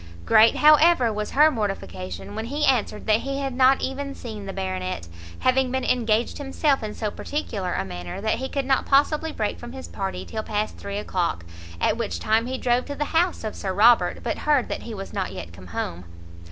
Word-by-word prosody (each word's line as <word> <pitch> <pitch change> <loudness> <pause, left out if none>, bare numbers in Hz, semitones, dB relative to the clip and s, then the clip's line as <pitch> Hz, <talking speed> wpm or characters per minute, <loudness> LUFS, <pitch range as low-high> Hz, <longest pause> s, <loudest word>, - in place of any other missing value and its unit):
Great, 220 +1 +6
however, 305 -5 +5
was 210 0 -3
her 305 +2 +5
mortification 95 - -4
when 220 - -4
he 290 +5 -1
answered 235 -5 +1
that 215 0 +3
he 275 +2 -3
had 275 -2 -2
not 260 +1 +4
even 275 +1 -3
seen 215 -4 -7
the - - -3
Baronet, 185 - -4 0.3
having 255 0 +3
been 260 +1 -1
engaged 230 -1 +1
himself 280 0 +1
in 215 -1 -5
so 215 -2 -2
particular 205 -12 -3
a 95 - -1
manner, 90 - -6
that 220 +3 0
he 265 0 -4
could 275 -2 -2
not 265 0 +1
possibly 300 +3 +3
break 215 -7 -2
from 240 +1 -9
his 265 0 -8
party 195 -1 -4
till 220 - -4
past 215 0 -2
three 200 0 -6
o'clock, 180 - -2 0.3
at - - +1
which 230 -3 -3
time 220 +2 +1
he 260 +1 -3
drove 245 0 +1
to 285 - -5
the 295 - -1
house 345 -2 +2
of 215 - -4
Sir 190 -1 -3
Robert, 230 +4 +4
but - - -2
heard 290 -5 +2
that - - -3
he 230 - -7
was 195 -1 -7
not 190 - -2
yet 85 -2 -8
come 90 +1 -12
home. 85 0 -4
225 Hz, 210 wpm, -24 LUFS, 195-270 Hz, 0.3 s, Great